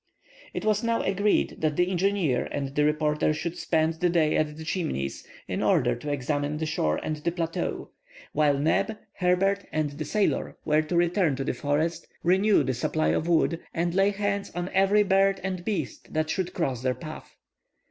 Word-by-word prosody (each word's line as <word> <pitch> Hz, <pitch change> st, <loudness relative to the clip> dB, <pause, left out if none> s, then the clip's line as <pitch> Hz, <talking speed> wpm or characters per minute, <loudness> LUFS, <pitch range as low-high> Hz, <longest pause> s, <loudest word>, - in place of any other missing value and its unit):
It -, -, -3 dB
was 215 Hz, 0 st, +2 dB
now 230 Hz, 0 st, +1 dB
agreed 200 Hz, +2 st, +1 dB
that 155 Hz, -2 st, 0 dB
the 180 Hz, +3 st, +2 dB
engineer 185 Hz, -7 st, +1 dB
and 140 Hz, -1 st, -3 dB
the 150 Hz, -, +2 dB
reporter 150 Hz, 0 st, +1 dB
should 170 Hz, +2 st, -4 dB
spend 160 Hz, -1 st, +1 dB
the 180 Hz, -, +2 dB
day 165 Hz, -3 st, +2 dB
at 150 Hz, -1 st, 0 dB
the 160 Hz, -, -7 dB
Chimneys, 155 Hz, -, -3 dB, 0.2 s
in -, -, -2 dB
order -, -, +3 dB
to 145 Hz, +5 st, -5 dB
examine 145 Hz, +2 st, -1 dB
the 160 Hz, -, -2 dB
shore 80 Hz, -, 0 dB
and 155 Hz, -, -2 dB
the 160 Hz, +3 st, -1 dB
plateau, 165 Hz, -1 st, -3 dB, 0.4 s
while 145 Hz, -2 st, +3 dB
Neb, 195 Hz, +9 st, +1 dB, 0.2 s
Herbert, 195 Hz, +2 st, +2 dB
and 155 Hz, -2 st, -1 dB
the 155 Hz, +2 st, -5 dB
sailor 210 Hz, +3 st, 0 dB
were 155 Hz, 0 st, +3 dB
to 155 Hz, +3 st, -2 dB
return 175 Hz, -3 st, +2 dB
to 135 Hz, -, -3 dB
the -, -, -1 dB
forest, 145 Hz, +6 st, -1 dB, 0.2 s
renew 190 Hz, +4 st, +4 dB
the 130 Hz, -, -1 dB
supply 155 Hz, +6 st, 0 dB
of 160 Hz, -, 0 dB
wood, 165 Hz, 0 st, +2 dB, 0.2 s
and 170 Hz, +1 st, 0 dB
lay 195 Hz, +2 st, +4 dB
hands 200 Hz, 0 st, -2 dB
on 175 Hz, +1 st, -2 dB
every 195 Hz, +2 st, +4 dB
bird 195 Hz, 0 st, +3 dB
and 185 Hz, -2 st, -3 dB
beast 205 Hz, +1 st, -4 dB
that 155 Hz, 0 st, 0 dB
should 185 Hz, -2 st, -2 dB
cross 135 Hz, -, -1 dB
their 130 Hz, 0 st, 0 dB
path. 155 Hz, -2 st, -9 dB
165 Hz, 190 wpm, -26 LUFS, 150-190 Hz, 0.4 s, renew